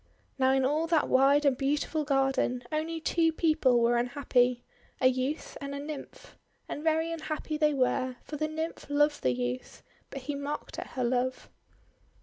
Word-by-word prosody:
Now 260 0 +4
in 265 -1 +2
all 305 +4 +1
that 325 -2 +2
wide 275 +3 +4
and 275 -2 +4
beautiful 290 +3 0
garden 270 -3 +1
only 320 +2 -2
two 325 +1 +2
people 310 -7 +3
were 235 +1 +3
unhappy, 245 0 +1 0.2
— - - -33
a - - 0
youth 260 +4 0
and 280 0 -5
a - - -4
Nymph. 295 0 -9 0.3
And 295 - -5
very 320 +1 +1
unhappy 310 -1 -4
they 300 -1 +2
were, 255 -1 +1
for 305 - -7
the 310 +1 -1
Nymph 315 -1 -5
loved 295 +1 +2
the 130 - +2
youth, 125 0 -4 0.3
but 275 - -7
he 285 +3 -4
mocked 285 +1 -5
at - - -6
her 255 - -1
love. 255 +1 -1
280 Hz, 175 wpm, -29 LUFS, 255-310 Hz, 0.3 s, Now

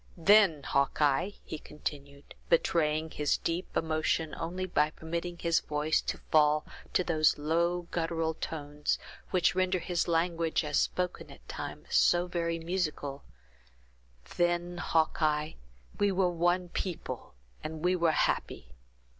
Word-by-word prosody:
Then, 185 -4 +5
Hawkeye," 140 +4 +2 0.2
he 155 - -6
continued, 140 -2 -7 0.2
betraying 160 -1 +2
his 150 -1 +1
deep 170 +3 -3
emotion, 160 0 0
only 180 +3 -3
by 150 -4 +2
permitting 170 +2 -5
his 170 -1 +2
voice 150 +1 0
to - - -3
fall 150 -1 +4 0.3
to 180 - +3
those 155 -3 +3
low, 170 +4 +1
guttural 165 -1 -1
tones, 150 -2 -3 0.3
which 180 -1 +3
render 185 0 +1
his 175 -1 -1
language, 165 -1 +1
as 150 -1 +1
spoken 180 -1 -2
at - - -15
times, - - -7
so 175 0 +4
very 170 -2 -1
musical; 165 -5 -3 1.2
"then, 175 0 0
Hawkeye, 155 -2 +1 0.5
we 205 -1 +3
were 185 -1 +2
one 175 +1 +1
people, 175 - -5 0.3
and 155 +1 -6
we 180 +1 +3
were 170 -2 +2
happy. 65 - -1
165 Hz, 130 wpm, -30 LUFS, 150-175 Hz, 1.2 s, Then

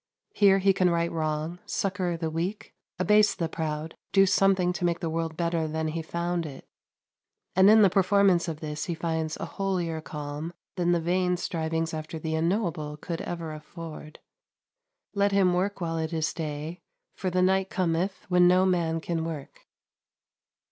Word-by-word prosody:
Here 195 -2 +5
he 195 0 +4
can 185 -1 +3
right 170 0 +1
wrong, 155 +1 -2
succour 185 -3 -1
the 165 -1 -3
weak, 175 +6 -3 0.2
abase 210 +2 +4
the 165 - -1
proud, 160 0 -4 0.2
do 195 -1 +6
something 190 -2 +3
to 180 - -5
make 170 -1 +1
the 165 - -3
world 165 -1 -2
better 170 -2 0
than 160 0 -2
he 165 +1 -3
found 170 +1 -2
it; 135 -3 -11 0.9
and 190 +2 +7
in 215 0 +7
the 195 - +6
performance 195 -2 +3
of 160 -2 -5
this 150 -1 -4
he 170 - -2
finds 160 -1 -2
a - - -4
holier 175 -5 -2
calm 150 +2 -6 0.2
than 175 -1 +1
the 175 - +3
vain 180 +2 +1
strivings 165 -1 -2
after 155 +1 -5
the 160 0 -3
unknowable 165 -3 -1
could 165 +2 -5
ever 165 -2 -5
afford. 155 0 -9 1.0
Let 200 0 +2
him 190 -2 +4
work 195 +3 0
while 165 -1 -1
it 160 +1 -3
is 160 -1 0
day, 155 +1 -5 0.3
for 190 - -3
"the 180 0 +2
night 190 +1 +2
cometh, 185 +1 -1
when 180 -1 +5
no 185 +1 +5
man 165 -3 +1
can 165 -1 -2
work." 160 -4 -7
170 Hz, 170 wpm, -27 LUFS, 160-185 Hz, 1.0 s, and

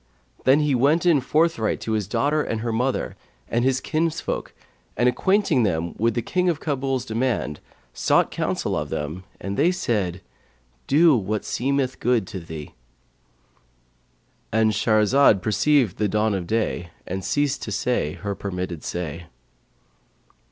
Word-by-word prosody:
Then 135 +3 +5
he 150 -2 +1
went 145 +8 +3
in 160 -6 +4
forthright 150 -4 +1
to 110 - -3
his 105 -3 0
daughter 145 +8 +1
and 115 -6 -3
her 115 0 -2
mother 125 +3 -1 0.3
and 120 +1 0
his 130 0 +2
kinsfolk, 160 +2 -2 0.5
and 120 +2 +3
acquainting 190 - +2
them 85 -5 0
with 115 0 +1
the 120 - -1
King 180 0 +1
of 165 -3 -1
Kabul's 135 -4 -1
demand 115 - -1 0.3
sought - - +2
counsel - - -1
of - - -3
them, 80 +5 -4
and 100 0 -4
they 155 +5 +4
said, 105 - -1 0.7
'Do 155 +1 +5
what 105 -1 -2
seemeth 135 0 -1
good 120 -5 +2
to 100 -4 -5
thee.'—And - - -7
Shahrazad 110 +2 +4
perceived 115 +2 +2
the 105 - +1
dawn 105 +1 +1
of 90 -3 -3
day 110 -5 -1 0.2
and 95 +1 -4
ceased 140 +8 0
to 105 - -5
say 100 -7 0
her 100 -1 -4
permitted 90 -4 -5
say. 85 -1 -5
110 Hz, 145 wpm, -23 LUFS, 95-135 Hz, 0.7 s, Then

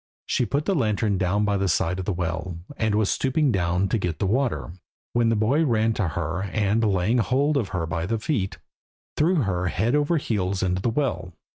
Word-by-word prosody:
She 125 - 0
put 145 +2 -1
the 200 - +1
lantern 105 - +1
down 100 +3 +1
by 100 -1 +1
the 100 0 0
side 90 +1 0
of 95 - -4
the 105 - 0
well, 85 0 -3 0.2
and 110 -4 0
was 105 -1 +2
stooping 135 +1 +1
down 90 -1 +1
to 115 - +1
get 85 -4 -2
the - - -1
water, 95 - 0 0.4
when 120 -1 +3
the 115 - +2
boy 120 +9 +2
ran 115 -5 +2
to 100 -4 -1
her, 80 +2 -3
and, 100 +2 0
laying 105 +3 +2
hold 140 +6 +1
of 125 -8 +1
her 90 -3 -2
by 80 +1 -3
the 115 +2 0
feet, 110 -4 -2 0.6
threw 160 -1 +2
her 90 -3 -1
head 110 +8 0
over 150 +3 +2
heels 100 -8 -1
into 90 0 0
the 120 - +1
well. 110 - -2
105 Hz, 210 wpm, -24 LUFS, 90-120 Hz, 0.6 s, when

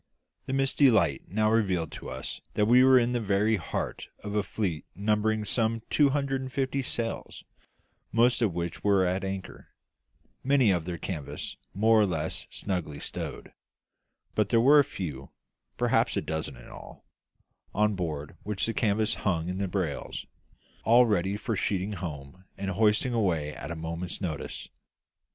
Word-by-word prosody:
The 135 - -2
misty 135 +1 +4
light 85 - +2
now 110 +3 +2
revealed 95 -8 +1
to - - -8
us 65 0 -6
that 105 - +3
we 125 +3 +6
were 130 0 +7
in 120 -1 +3
the 120 - 0
very 105 +1 +2
heart 85 - -4 0.2
of 105 - -5
a 105 - +2
fleet 95 -6 -3
numbering 105 +2 +1
some 115 +1 0
two 145 -2 +5
hundred 135 -1 0
and 130 0 -6
fifty 135 +1 -1
sail, 115 -2 -3 0.8
most 120 +2 +3
of 110 -5 +3
which 85 -1 -4
were 100 -2 +4
at 90 +1 0
anchor, 95 -1 -6 0.8
many 130 -6 +4
with 85 -3 -1
their 85 -1 -4
canvas 80 -4 -5 0.2
more 110 +2 +5
or 105 - +3
less 80 -3 -3
snugly 90 -7 -3
stowed; - - -6 0.8
but 105 -2 +1
there 115 - +4
were 140 +5 +7
a - - +6
few 75 - -6 0.5
perhaps - - +2
a - - +1
dozen 80 -4 -3
in - - -13
all - - -12 0.7
on 105 +1 +2
board 80 -6 -4
which 105 -1 -1
the 115 - -1
canvas 110 -1 +1
hung 85 -4 0
in 90 +1 -3
the 100 - 0
brails, 90 -6 -3 0.6
all 120 +2 +6
ready 100 -2 +1
for 110 +2 -2
sheeting 95 +1 -1
home 80 -1 -7
and 100 0 -2
hoisting 105 +5 +2
away 85 -10 0
at - - -7
a 85 - -4
moment's 85 +2 -5
notice. 80 -7 -5
100 Hz, 165 wpm, -28 LUFS, 85-115 Hz, 0.8 s, were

